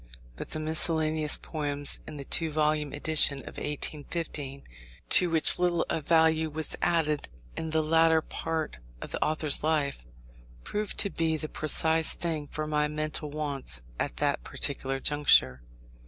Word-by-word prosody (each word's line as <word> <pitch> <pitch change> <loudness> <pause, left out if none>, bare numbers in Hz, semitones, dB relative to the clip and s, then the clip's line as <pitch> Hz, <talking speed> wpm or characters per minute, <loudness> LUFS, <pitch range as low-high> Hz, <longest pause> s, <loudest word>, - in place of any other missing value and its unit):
But - - -8
the 155 - -3
miscellaneous 155 -1 +1
poems, 145 -2 -1
in 155 - -7
the 140 - -8
two 165 +3 +2
volume 150 -1 0
edition 145 -2 +2
of - - -11
1815 150 -1 -4 0.5
(to 180 - +6
which 165 +1 +5
little 175 -2 +1
of 155 -3 -3
value 160 -1 +3
was 155 +1 -2
added 155 - 0 0.3
in 160 - -4
the 160 0 +1
latter 160 +1 +4
part 160 - -4 0.2
of - - -8
the - - -1
author's 155 -2 +2
life), 145 - -1 0.6
proved 210 -1 -4
to 200 - -2
be 160 -1 0
the 155 - -5
precise 160 +1 +2
thing 160 -4 -3
for 155 +2 -4
my 150 0 0
mental 155 0 -3
wants 140 - -3 0.2
at - - -3
that - - 0
particular 135 -2 -1
juncture. 100 - +3
155 Hz, 150 wpm, -28 LUFS, 145-160 Hz, 0.6 s, to